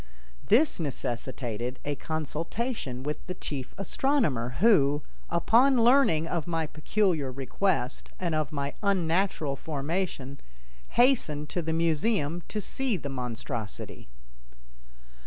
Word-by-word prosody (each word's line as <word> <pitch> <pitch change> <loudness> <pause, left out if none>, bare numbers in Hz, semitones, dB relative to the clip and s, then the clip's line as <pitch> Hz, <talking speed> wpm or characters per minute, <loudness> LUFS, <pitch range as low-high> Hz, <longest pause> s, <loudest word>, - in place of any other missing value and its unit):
This 265 +3 +4
necessitated 125 -4 -3
a 145 - 0
consultation 160 - -3
with 150 +2 -4
the 180 - -4
chief 135 -6 -5
astronomer 195 - 0
who, 145 -9 +5 0.3
upon 240 +7 +4
learning 235 - +5
of 170 -2 -2
my 165 -2 0
peculiar 155 -2 0
request 135 0 -1
and 175 -3 -1
of 155 -1 0
my 140 -1 -2
unnatural 180 -6 +1
formation, 145 -2 -3 0.6
hastened 190 - +3
to 175 - -1
the 165 0 -2
museum 165 +1 +1
to 215 - -3
see 250 +1 -1
the 145 -4 -5
monstrosity. 120 -4 -5
160 Hz, 110 wpm, -28 LUFS, 140-195 Hz, 0.6 s, who